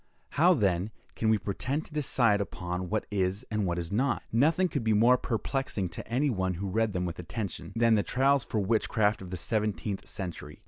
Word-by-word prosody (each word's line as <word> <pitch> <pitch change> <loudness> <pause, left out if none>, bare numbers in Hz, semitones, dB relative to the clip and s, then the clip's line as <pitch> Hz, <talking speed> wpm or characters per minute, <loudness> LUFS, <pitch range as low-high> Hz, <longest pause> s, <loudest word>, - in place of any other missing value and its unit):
How, 175 +6 +4
then, 95 - +1 0.3
can 110 - 0
we 110 - +4
pretend 120 +10 -3
to - - -15
decide 120 -8 +2
upon 90 -1 -4
what 110 0 -1
is 95 +3 -1
and 105 -3 0
what 85 0 -1
is 85 -1 -4
not? 120 +4 +1
Nothing 160 +10 +3
could 145 -8 -3
be 110 -1 +2
more 115 +4 +6
perplexing 120 -5 -2
to 85 - -8
any 130 +5 +1
one 95 -4 -1
who 100 +3 -4
read 110 0 +1
them 90 -1 -1
with 85 -1 -5
attention, 100 +3 -5
than 115 0 +4
the 105 - +4
trials 135 +4 +2
for 110 - -2
witchcraft 110 0 +1
of 95 - -8
the 90 - -4
seventeenth 105 0 -2
century. 85 -5 -6
105 Hz, 200 wpm, -29 LUFS, 95-125 Hz, 0.3 s, more